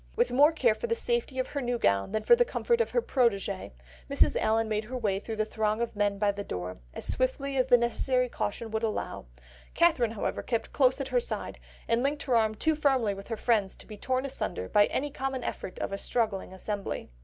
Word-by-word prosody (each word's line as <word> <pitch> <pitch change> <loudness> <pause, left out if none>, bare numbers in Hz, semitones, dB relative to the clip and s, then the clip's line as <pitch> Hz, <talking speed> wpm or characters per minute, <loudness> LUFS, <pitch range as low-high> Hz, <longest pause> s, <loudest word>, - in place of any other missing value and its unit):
With 480 +2 +2
more 290 +5 +6
care 260 -8 +3
for 475 - -5
the 460 - +1
safety 470 - -1
of 255 - -1
her 285 - -3
new 245 -1 -1
gown 100 - +1
than 215 0 -1
for 475 - +7
the 485 - +4
comfort 475 0 0
of - - 0
her 485 - 0
protegée, 200 -7 0 0.4
Mrs. - - +4
Allen 225 +1 +1
made 215 0 -1
her 255 +3 -5
way 205 -5 0
through 220 +2 -6
the 215 0 0
throng 215 0 -1
of 235 -1 -2
men 205 -1 +1
by 205 0 +2
the 200 0 -6
door, 90 - -5
as - - -6
swiftly 270 +2 0
as 255 -1 +2
the 245 -2 +7
necessary 250 +2 +1
caution 225 -1 -4
would 220 0 -1
allow; 215 - -3 0.5
Catherine, 270 -10 +3
however, 215 - -2
kept 230 -2 -3
close 260 -1 +3
at 275 - -3
her - - +3
side, 485 - -5 0.3
and 230 +1 +2
linked 285 +2 -1
her 255 -4 +1
arm 220 -1 +2
too 315 +8 +1
firmly 270 -8 +2
within 195 +2 -10
her 225 - -2
friend's 210 -6 +1
to - - -13
be 215 - -9
torn 255 +5 -1
asunder 95 - -3
by 205 - +4
any 290 +2 -2
common 265 -2 -3
effort 185 - -5
of - - -3
a 195 - -3
struggling 215 -6 -1
assembly. 195 - -5
235 Hz, 230 wpm, -28 LUFS, 210-270 Hz, 0.5 s, for